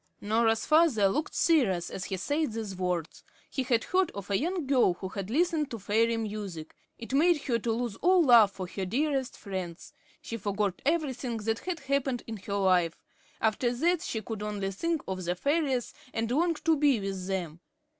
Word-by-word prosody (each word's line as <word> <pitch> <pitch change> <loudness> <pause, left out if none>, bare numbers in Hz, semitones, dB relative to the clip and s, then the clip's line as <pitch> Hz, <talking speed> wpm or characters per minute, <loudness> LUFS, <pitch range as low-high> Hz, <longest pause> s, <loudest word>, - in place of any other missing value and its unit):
Norah's 225 +1 +1
father 305 -10 +4
looked 300 +10 -2
serious 200 - +2
as 190 - -5
he 190 - -3
said 290 - -1
these 215 -4 -4
words. 180 -3 -3 0.3
He 270 - -1
had 245 -3 +1
heard 370 -1 +1
of 200 0 -6
a 195 - +2
young 345 +1 -1
girl 255 -9 +3
who 190 +1 -6
had 195 0 -5
listened 320 +2 +1
to 230 - -5
fairy 225 +3 +1
music. 205 -7 -5 0.2
It 230 +3 -8
made 315 +1 +3
her 235 -3 0
lose 230 -1 -2
all 365 0 +4
love 235 -7 +7
for 195 -1 -6
her 190 +2 -5
dearest 270 +3 -1
friends. 185 -4 -6 0.3
She 230 - -6
forgot 205 -2 -2
everything 265 -7 0
that 225 +1 -1
had 355 -4 -4
happened 270 -2 -1
in 225 -1 -6
her 200 +1 -5
life. 180 -4 +2 0.4
After 225 +2 +1
that, 340 +6 +2
she 220 -10 -4
could 220 0 -5
only 205 -2 -2
think 330 - -2
of 185 -1 -3
the 175 +1 -1
fairies, 280 - 0 0.2
and 225 +1 -1
long 335 +5 +2
to 320 +1 +2
be 285 -5 +3
with 195 -2 -4
them. 175 -4 -3
225 Hz, 185 wpm, -29 LUFS, 195-285 Hz, 0.4 s, love